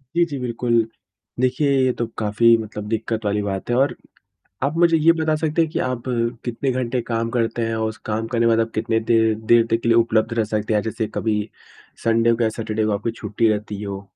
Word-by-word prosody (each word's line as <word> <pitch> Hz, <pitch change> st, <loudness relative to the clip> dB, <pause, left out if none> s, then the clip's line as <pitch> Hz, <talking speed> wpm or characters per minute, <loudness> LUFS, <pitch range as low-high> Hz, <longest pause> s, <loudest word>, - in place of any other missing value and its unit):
जी, 170 Hz, -, +4 dB
जी 145 Hz, -4 st, -5 dB
बिल्कुल। 120 Hz, -1 st, -2 dB, 0.7 s
देखिए, 130 Hz, +3 st, +1 dB, 0.2 s
ये 130 Hz, -, +3 dB
तो 120 Hz, -, +1 dB
काफ़ी 115 Hz, +2 st, +4 dB
मतलब 105 Hz, -1 st, -6 dB
दिक्कत 110 Hz, 0 st, -2 dB
वाली 105 Hz, 0 st, +1 dB
बात 100 Hz, 0 st, -4 dB
है 120 Hz, -, +2 dB
और 135 Hz, +3 st, +2 dB, 0.7 s
आप 140 Hz, +4 st, 0 dB
मुझे 170 Hz, -1 st, +5 dB
ये 160 Hz, +2 st, +5 dB
बता 160 Hz, -1 st, 0 dB
सकते 160 Hz, +1 st, +1 dB
हैं 160 Hz, -, -1 dB
कि -, -, -2 dB
आप 125 Hz, -2 st, -3 dB, 0.4 s
कितने 125 Hz, +3 st, -2 dB
घंटे 125 Hz, 0 st, -1 dB
काम 115 Hz, 0 st, -2 dB
करते 115 Hz, 0 st, -1 dB
हैं 115 Hz, -, -2 dB
और 110 Hz, 0 st, 0 dB
उस 110 Hz, -, -8 dB
काम 110 Hz, +1 st, -1 dB
करने 115 Hz, 0 st, +2 dB
बाद 115 Hz, -1 st, +4 dB
आप 115 Hz, -, -1 dB
कितने 110 Hz, +1 st, 0 dB
देर 110 Hz, -1 st, +4 dB, 0.2 s
देर 120 Hz, -1 st, +6 dB
तक 115 Hz, +1 st, 0 dB
लिए 115 Hz, -, +4 dB
उपलब्ध 115 Hz, -1 st, +2 dB
रह 110 Hz, -, +3 dB
सकते 110 Hz, 0 st, 0 dB
हैं? 105 Hz, -, +2 dB
जैसे 110 Hz, +1 st, -3 dB
कभी 110 Hz, -1 st, 0 dB, 0.7 s
संडे 115 Hz, +1 st, +3 dB
को 115 Hz, -, -2 dB
या 115 Hz, -, +3 dB
सैटरडे 110 Hz, -1 st, -1 dB
को 110 Hz, -, +1 dB
आपकी 105 Hz, +3 st, -1 dB
छुट्टी 115 Hz, +2 st, +1 dB
रहती 105 Hz, -1 st, -2 dB
हो? 100 Hz, -1 st, -5 dB
115 Hz, 220 wpm, -21 LUFS, 110-125 Hz, 0.7 s, देर